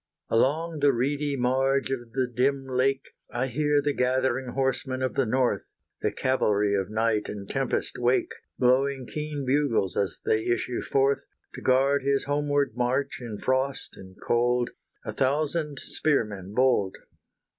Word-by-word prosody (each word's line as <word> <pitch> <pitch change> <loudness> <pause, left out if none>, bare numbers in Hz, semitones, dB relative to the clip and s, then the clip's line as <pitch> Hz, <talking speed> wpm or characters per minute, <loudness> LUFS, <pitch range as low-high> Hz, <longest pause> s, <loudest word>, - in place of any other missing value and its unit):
Along 155 +7 +1
the 140 -1 +4
reedy 140 +4 0
marge 135 +2 +1
of 120 -3 -4
the 130 0 +1
dim 135 +3 0
lake, 130 +1 0 0.2
I 120 +2 -1
hear 145 +3 +1
the 145 0 +1
gathering 130 0 0
horsemen 130 0 -1
of 130 - -1
the 135 - +1
North, 125 +2 +1 0.3
The - - +1
cavalry 105 -6 +1
of 95 -1 0
night 110 0 0
and 100 -1 -6
tempest 135 0 -2
wake, 125 +1 +2 0.3
Blowing 130 +1 +2
keen 150 -2 -3
bugles 130 -8 +1
as 95 -4 -1
they 110 0 +2
issue 120 +1 -1
forth, 135 0 +1 0.3
To - - -8
guard 135 +2 +3
his 140 0 +1
homeward 145 0 0
march 125 +3 0
in 115 -4 -6
frost 130 +3 -1
and 95 0 -13
cold, 120 +1 +1 0.3
A - - -3
thousand 150 +2 0
spearmen 105 -11 -1
bold! 125 -7 +2
130 Hz, 145 wpm, -26 LUFS, 120-140 Hz, 0.3 s, the